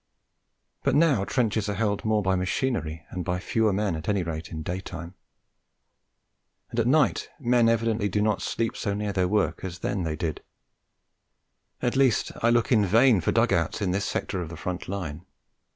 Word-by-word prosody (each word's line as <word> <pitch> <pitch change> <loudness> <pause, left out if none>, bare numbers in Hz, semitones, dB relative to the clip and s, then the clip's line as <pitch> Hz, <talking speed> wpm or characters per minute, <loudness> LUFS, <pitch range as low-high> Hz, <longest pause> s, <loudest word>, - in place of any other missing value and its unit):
But - - +1
now 145 -10 +4
trenches 110 -4 0
are 100 - -1
held 105 -1 0
more 110 -1 +1
by 95 0 +2
machinery 90 - -2
and 90 - -4
by 90 0 -1
fewer 110 +4 +1
men, 100 -2 0
at 80 +3 -5
any 100 -3 +1
rate, 80 -1 -5
in 80 -1 -6
daytime; 90 0 -6 1.6
and 115 - -2
at 115 - +2
night 150 +4 +2
men 120 -3 +3
evidently 115 -2 +1
do 105 - 0
not 105 0 +1
sleep 115 -1 -2
so 100 -1 -2
near 105 -1 -2
their 95 -2 +1
work 105 +1 0
as 90 -2 -5
then 95 +2 -2
they 80 -3 -2
did; 80 0 -3 1.4
at 120 - +1
least, 135 -5 +3
I 115 - +4
look 120 +1 +2
in 110 -4 +5
vain 110 +2 +5
for - - +1
dug - - +3
outs - - 0
in 95 -3 0
this 100 +2 0
sector 95 - -2
of 85 - -5
the 85 - -8
front 90 +1 -4
line. 90 -5 -5
100 Hz, 185 wpm, -26 LUFS, 90-115 Hz, 1.6 s, in